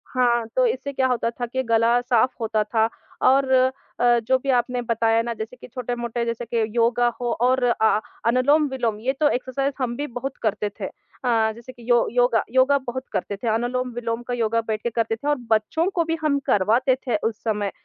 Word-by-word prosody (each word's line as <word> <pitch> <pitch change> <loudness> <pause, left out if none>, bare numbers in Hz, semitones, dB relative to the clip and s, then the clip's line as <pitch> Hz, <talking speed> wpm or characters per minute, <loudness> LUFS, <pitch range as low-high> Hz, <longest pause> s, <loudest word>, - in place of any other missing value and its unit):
हाँ, 240 -2 +2
तो - - +4
इससे 280 - -3
क्या 260 0 +2
होता 245 -2 0
था 240 +1 -4
के 260 +2 -3
गला 230 0 +3
साफ़ 245 0 +2
होता 220 -1 +1
था 220 +1 +1 0.4
और 265 0 +4 0.5
अ, 240 0 +4
जो 260 +3 +2
भी 275 +1 -6
आपने 245 0 +1
बताया 230 -1 +1
ना 235 0 -3
जैसे 225 +2 -7
कि 250 - -13
छोटे-मोटे 240 -1 -3
जैसे 230 0 -3
कि 230 0 0
योगा 240 +1 +3
हो 240 -1 -1
और 255 +1 +3
अ, 220 -3 +3 0.3
अनुलोम-विलोम 255 -2 +2
ये 260 +4 -1
तो 300 -1 +4
एक्सरसाइज़ 270 +2 -1
हम 245 -2 -1
भी 290 - -3
बहुत 250 +2 -6
करते 210 -1 0
थे। - - -3
अ, 225 -4 -1
जैसे 235 +2 -11
कि 240 -1 -13
यो 240 -1 +4
योगा 245 -2 +3
योगा 260 +2 +4
बहुत 260 +2 -3
करते 200 - -2
थे। 235 - -5
अनुलोम-विलोम 240 0 -2
का 245 - -2
योगा 230 -1 +1
बैठ 215 -1 -2
के 235 - 0
करते 225 -1 -1
थे 280 - -7
और 295 - +3 0.2
बच्चों 220 - +2
को 340 - +3
भी 325 0 -1
हम 290 -2 +2
करवाते 230 +7 +3
थे 235 - +1
उस 220 - -13
समय। 210 -3 -1
240 Hz, 205 wpm, -23 LUFS, 230-260 Hz, 0.5 s, तो